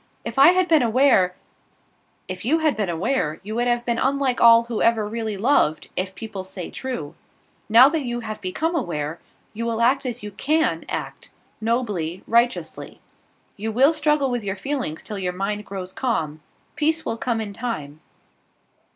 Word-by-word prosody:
If - - -3
I 275 - +9
had 365 +1 +4
been 320 -4 +5
aware 230 -6 +3 0.5
" - - -41
"If 185 0 -6
you 285 +9 +3
had 315 -2 +1
been 210 -4 -1
aware, 165 - -1
you 215 +2 -6
would 240 +2 0
have 240 0 0
been 235 -1 0
unlike 270 -2 +1
all 230 0 +8
who 235 -2 -4
ever 225 -2 +3
really 220 -1 -3
loved, 210 - +2
if 185 +1 -2
people 215 -4 -6
say 185 -1 -7
true. 210 - -5 0.6
Now 235 +4 +8
that 310 0 -1
you 240 0 -3
have 215 -1 -6
become 310 - -2
aware, 165 - -3 0.3
you 225 +2 -4
will 230 -1 -1
act 260 +3 +2
as 240 -2 -5
you 210 - -6
can 310 +10 0
act - - -5 0.3
nobly 210 -7 -1
righteously. 235 +2 0 0.6
You 220 +2 -4
will 270 +8 +4
struggle 300 -3 +1
with 245 -2 -2
your 195 -1 -2
feelings 245 - -3
till 210 -2 -5
your 180 -1 -2
mind 205 +3 -3
grows 190 -1 -6
calm. 155 - -2 0.3
Peace 315 +1 0
will 225 - -1
come 235 -1 -1
in 210 -2 -5
time." 160 -11 -5
230 Hz, 175 wpm, -23 LUFS, 195-260 Hz, 0.6 s, I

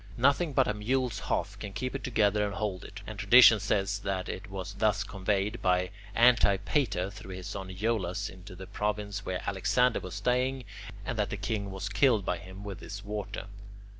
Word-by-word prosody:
Nothing 140 +5 +3
but 135 -1 +3
a 105 - +1
mule's 125 +4 -1
hoof - - -1
can 100 - -6
keep 130 +4 -3
it 135 -3 -4
together 105 -4 +2
and 100 -1 -2
hold 100 -4 -2
it, 100 0 -9
and 110 -2 -7
tradition 115 +2 +8
says 100 0 0
that 95 -2 -2
it 100 +2 -6
was 95 0 -5
thus 105 -1 +1
conveyed 100 +2 -1
by 90 0 +2 0.2
Antipater 110 -3 +3
through 95 -3 -9
his 90 -1 -8
son 95 -1 -5
Iollas 95 -1 -1
into 95 +1 -11
the 95 +1 -8
province 105 0 -3
where 90 -1 -4
Alexander 120 +5 +2
was 90 - -7
staying, 125 +1 0 0.4
and 120 -4 -3
that 105 - +1
the 100 - -3
king 100 0 -2
was 95 0 -4
killed 105 0 +3
by 90 - -1
him 95 +3 -10
with 100 -3 -6
this 100 +1 -8
water. 105 -1 -4
100 Hz, 190 wpm, -30 LUFS, 95-115 Hz, 0.4 s, tradition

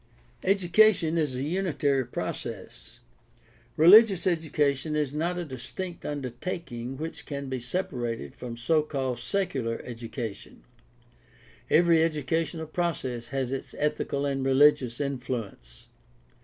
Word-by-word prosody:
— - - -29
Education 190 -2 +4
is 145 -5 0
a 130 - -2
unitary 145 -6 0
process. - - -6 0.8
Religious 195 +3 +7
education 155 -4 0
is 150 -2 0
not 170 +4 -1
a 175 - -3
distinct 160 +7 -6
undertaking 135 -2 -5
which 160 +3 -6
can 140 -2 -5
be 130 -1 -2
separated 125 -4 -3
from 120 -2 -7
so 155 +7 +2
called 135 -5 -3
"secular" 125 -5 -1
education. 115 -3 -7 1.1
Every 170 -1 +5
educational 160 +1 -1
process 145 -8 -2
has 135 -1 -2
its 135 - -5
ethical 145 -1 -1
and 135 -1 -1
religious 135 -3 +4
influence. 120 - -5
140 Hz, 115 wpm, -27 LUFS, 125-165 Hz, 1.1 s, Religious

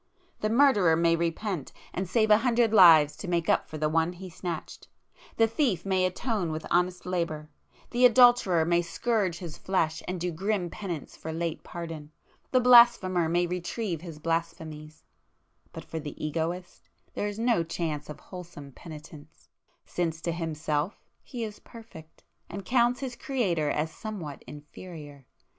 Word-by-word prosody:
The 215 - -1
murderer 220 -9 +4
may 165 0 +3
repent, 170 -1 -3 0.2
and 185 -1 -3
save 220 +1 +2
a 210 - +7
hundred 235 -2 +2
lives 165 -7 +7
to 200 - -7
make 170 -2 0
up - - +2
for 155 - -6
the 155 0 0
one 165 +2 +1
he 185 +1 -10
snatched,—the 175 +5 -4
thief 225 - 0
may 190 -1 +2
atone 195 -2 -2
with 155 0 -5
honest 180 0 +1
labour,—the 170 +6 -4
adulterer 240 -9 +5
may 170 +1 +2
scourge 190 +1 -1
his 170 -4 -8
flesh 165 -4 0
and 180 0 -3
do 175 +1 -2
grim 185 +1 -2
penance 175 -8 -6
for 160 - -7
late 165 0 -3
pardon,—the 165 - -5
blasphemer 235 -9 +6
may 175 +1 +2
retrieve 180 0 -3
his 165 -3 -9
[p 150 - -19
465] 160 -2 -4
blasphemies,—but - - -17
for 160 - -5
the 150 -2 -8
Egoist 160 - -4 0.2
there 205 - -2
is 205 0 -5
no 230 -5 +2
chance 160 -3 -4
of 150 - -8
wholesome 175 -6 -10
penitence, 155 0 -13 0.4
since 165 -2 -2
to 170 - -2
himself 160 +1 -3 0.2
he 240 -3 -6
is 210 -2 -6
perfect, 220 -9 -14 0.3
and 195 +1 -7
counts 245 +2 +2
his 255 -3 -4
Creator 185 - -1
as 155 +2 -1
somewhat 175 -8 -7
inferior. 150 -2 -11
175 Hz, 150 wpm, -28 LUFS, 160-205 Hz, 0.4 s, a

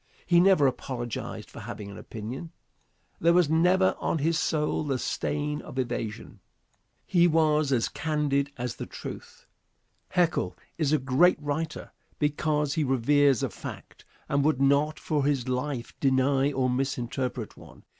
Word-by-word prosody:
He 175 -1 +5
never 185 -5 +5
apologized 120 -3 -3
for - - -10
having 100 -1 -7
an - - -10
opinion. 120 +9 -7 0.7
There 170 +1 +4
was 175 -4 +4
never 180 +4 +4
on - - 0
his 160 +2 +1
soul 155 -1 0
the 140 -3 -1
stain 150 +3 -2
of - - -10
evasion. 120 -4 -4 0.7
He 175 -1 +4
was 155 -3 +2
as 120 -4 +2
candid 145 -3 -1
as 120 -1 -4
the - - -6
truth. - - -9 0.6
Haeckel 175 -3 +1 0.2
is 150 -3 +1
a 155 - +4
great 135 +7 +3
writer 150 +2 -4 0.3
because 150 -1 0
he 155 - +1
reveres 135 0 +3
a - - 0
fact, - - -9 0.2
and 140 0 +1
would 150 -3 +2
not 140 +3 +3
for 155 -6 -1
his 135 -3 0
life 130 -1 -3
deny 135 +1 +2
or 130 -2 0
misinterpret 125 -2 -2
one. - - -15
145 Hz, 145 wpm, -27 LUFS, 130-155 Hz, 0.7 s, He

